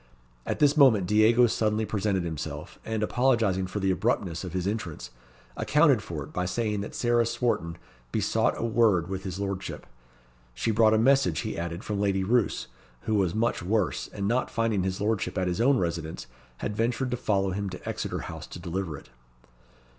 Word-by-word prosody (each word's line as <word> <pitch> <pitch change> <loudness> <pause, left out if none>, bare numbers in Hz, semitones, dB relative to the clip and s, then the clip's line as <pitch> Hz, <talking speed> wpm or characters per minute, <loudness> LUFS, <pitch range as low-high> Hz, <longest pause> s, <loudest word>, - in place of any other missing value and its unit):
At - - -1
this 145 0 +4
moment 125 - +6
Diego 110 +5 +5
suddenly 110 -1 0
presented 100 -3 0
himself, 80 -4 -6
and 110 -1 -2
apologizing 110 -6 +2
for 95 +3 -4
the 95 -1 +1
abruptness 95 -5 -1
of 90 -2 -6
his 90 -1 -2
entrance, 90 - -4 0.4
accounted 150 -6 +3
for 80 -6 -5
it 75 - -12
by 90 - -1
saying 105 +2 -1
that 100 - -7
Sarah 120 -1 +2
Swarton 115 -8 -1 0.3
besought - - +1
a - - -2
word 110 -7 +3
with 95 0 -4
his 95 -1 -4
Lordship. 100 -1 -4 0.7
She 115 - 0
brought 110 0 +4
a - - +4
message, 130 - +3
he - - -4
added, 85 +2 -4
from 105 -2 -3
Lady 100 -2 +1
Roos, 115 +2 +1 0.4
who 110 - -2
was 95 -4 +1
much 115 -2 0
worse, 100 +1 0
and 100 -1 -4
not 120 +4 +1
finding 115 -3 0
his 95 0 -2
Lordship 105 -1 -1
at 95 - +1
his 90 +5 -1
own 135 +2 +4
residence 85 -4 -3 0.3
had 105 - -4
ventured 120 +3 0
to 125 - -1
follow 100 -4 0
him 100 +1 -3
to 90 - -9
Exeter - - -3
House - - -7
to - - -9
deliver 85 -2 -4
it. - - -16
105 Hz, 185 wpm, -27 LUFS, 90-115 Hz, 0.7 s, moment